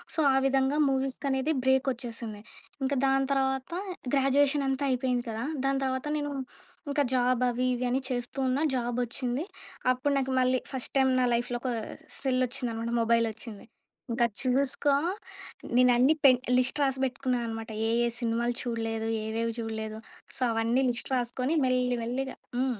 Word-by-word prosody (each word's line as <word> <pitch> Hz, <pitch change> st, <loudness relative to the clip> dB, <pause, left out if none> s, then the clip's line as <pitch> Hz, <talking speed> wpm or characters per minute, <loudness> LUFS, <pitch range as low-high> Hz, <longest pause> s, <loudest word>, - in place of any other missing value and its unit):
So -, -, -2 dB
ఆ -, -, +2 dB
విధంగా 270 Hz, +2 st, +2 dB
మూవీస్‌కి 270 Hz, +1 st, -1 dB
అనేది 265 Hz, +4 st, +1 dB
బ్రేక్ 265 Hz, +1 st, +3 dB
ఒచ్చేసింది. 230 Hz, -3 st, -7 dB, 0.4 s
ఇంకా 280 Hz, +1 st, +1 dB
దాని 270 Hz, 0 st, +3 dB
తర్వాత 265 Hz, +2 st, 0 dB, 0.4 s
గ్రాడ్యుయేషన్ 275 Hz, +1 st, +3 dB
అంతా 270 Hz, +1 st, -1 dB
అయిపోయింది 250 Hz, -1 st, 0 dB
కదా! 225 Hz, +3 st, -3 dB, 0.2 s
దాని 275 Hz, 0 st, +2 dB
తర్వాత 260 Hz, +1 st, -2 dB
నేను, 290 Hz, -1 st, -2 dB, 0.6 s
ఇంకా 285 Hz, 0 st, +2 dB
జాబ్ 250 Hz, 0 st, +2 dB
అవి 245 Hz, +1 st, 0 dB
ఇవి 250 Hz, +1 st, -2 dB
అని 255 Hz, +2 st, +1 dB
చేస్తూ 245 Hz, +1 st, -3 dB
ఉన్నా. 260 Hz, +4 st, +1 dB
జాబ్ 240 Hz, -1 st, -1 dB
వచ్చింది. 250 Hz, +4 st, -2 dB, 0.5 s
అప్పుడు 265 Hz, +3 st, 0 dB
నాకు 265 Hz, -1 st, 0 dB
మళ్ళీ 255 Hz, 0 st, +3 dB
ఫస్ట్ 260 Hz, -2 st, -3 dB
టైమ్ 265 Hz, -1 st, +4 dB
నా 250 Hz, -, +3 dB
లైఫ్‌లో 240 Hz, +1 st, 0 dB
ఒక 255 Hz, -, -2 dB, 0.5 s
సెల్ 260 Hz, -2 st, +1 dB
వచ్చిందనమాట, 235 Hz, -2 st, -3 dB
మొబైల్ 230 Hz, 0 st, +3 dB
వచ్చింది. 215 Hz, -1 st, -8 dB, 0.5 s
ఇంకా 235 Hz, +1 st, +3 dB, 0.2 s
చూసుకో 275 Hz, +2 st, +1 dB, 0.8 s
నేను 250 Hz, 0 st, +6 dB
అన్నీ 260 Hz, +6 st, +5 dB
పెన్ 255 Hz, -2 st, +7 dB, 0.2 s
లిస్ట్ 260 Hz, +3 st, +1 dB
రాసి 265 Hz, -1 st, 0 dB
బెట్టుకున్నా 255 Hz, -1 st, -1 dB
అనమాట. 225 Hz, 0 st, -5 dB, 0.2 s
ఏ, -, -, +1 dB, 0.2 s
ఏ -, -, +2 dB
సినిమాలు 235 Hz, +1 st, 0 dB
చూడలేదు? 225 Hz, -2 st, -2 dB, 0.2 s
ఏవేవి 230 Hz, +1 st, -1 dB
చూడలేదు? 220 Hz, -1 st, -4 dB, 0.4 s
సో -, -, -13 dB
అవన్నీ 230 Hz, +4 st, +1 dB
లిస్ట్ 240 Hz, +2 st, -4 dB
రాసుకొని 255 Hz, +5 st, -1 dB
మెల్లి 250 Hz, -1 st, +1 dB
మెల్లిగా 260 Hz, +3 st, -3 dB, 0.2 s
హ్మ్. 255 Hz, -4 st, 0 dB
255 Hz, 160 wpm, -28 LUFS, 235-270 Hz, 0.8 s, పెన్